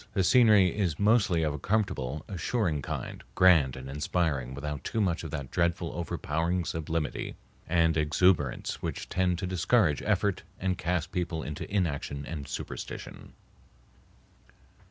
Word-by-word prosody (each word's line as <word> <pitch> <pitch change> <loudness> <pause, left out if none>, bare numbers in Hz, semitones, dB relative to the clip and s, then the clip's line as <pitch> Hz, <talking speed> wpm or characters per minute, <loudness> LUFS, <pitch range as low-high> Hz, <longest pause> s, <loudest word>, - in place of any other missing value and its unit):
The 95 - +2
scenery 105 -4 +5
is 90 -7 0
mostly 100 -6 +3
of 75 -2 0
a 75 - -5
comfortable, 90 - -1
assuring 90 -4 -1
kind, - - -5
grand 85 -9 +5
and 65 0 -8
inspiring 70 -2 -1
without 75 +1 -5
too 115 - -2
much 90 -6 +1
of 80 - -5
that 70 -3 -5
dreadful 85 0 0
overpowering 85 +1 -1
sublimity 80 -1 -3 0.3
and 80 -1 +3
exuberance 75 -2 +1
which - - -4
tend 90 -1 +1
to 90 - -3
discourage 85 -5 +2
effort 100 -2 +1 0.2
and 95 0 0
cast 85 -1 -1
people 85 -3 -2
into 75 +5 -6
inaction 70 -7 -1
and 75 -2 -6
superstition. - - -7
85 Hz, 135 wpm, -29 LUFS, 75-95 Hz, 0.3 s, scenery